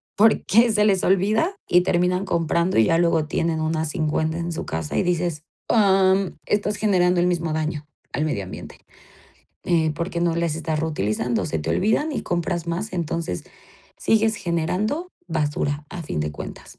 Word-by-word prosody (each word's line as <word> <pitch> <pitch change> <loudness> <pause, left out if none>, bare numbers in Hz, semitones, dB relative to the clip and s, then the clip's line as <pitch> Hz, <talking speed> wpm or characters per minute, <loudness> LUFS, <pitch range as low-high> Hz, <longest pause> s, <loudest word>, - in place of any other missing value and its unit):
porque 225 +2 +4
se 210 -1 +3
les 195 -3 +2
olvida 215 - +2
y 180 - +5
terminan 180 +1 +1
comprando 170 0 0
y 110 - +6
ya 165 0 +3
luego 170 -2 +2
tienen 160 +1 -1
unas 160 0 -1
50 160 0 -1
en 170 0 -3
su 165 - -4
casa. 80 -2 -3
Y - - +2
dices, 175 -3 -1 0.2
am, 195 -3 +3
estás 210 0 0
generando 180 -4 +2
el 175 - +3
mismo 170 -3 -1
daño 155 -1 -3 0.3
al 150 +4 0
medio 100 -11 -2
ambiente, 95 - -9 0.9
eh, 160 -3 +2
porque 170 +1 -3
no 170 -1 +1
les 170 -2 0
estás 160 -2 -2
reutilizando. 120 -6 -1
Se 80 - -2
te 75 - -5
olvidan 225 +10 +1
y - - -3
compras 175 -1 -2
más. 190 +5 -3
Entonces, 165 - -3 0.5
sigues 220 0 +2
generando 185 - -1 0.2
basura 150 -2 -1
a 175 - -6
fin 145 - -3
de 75 0 -2
cuentas. - - -9
170 Hz, 170 wpm, -23 LUFS, 155-190 Hz, 0.9 s, y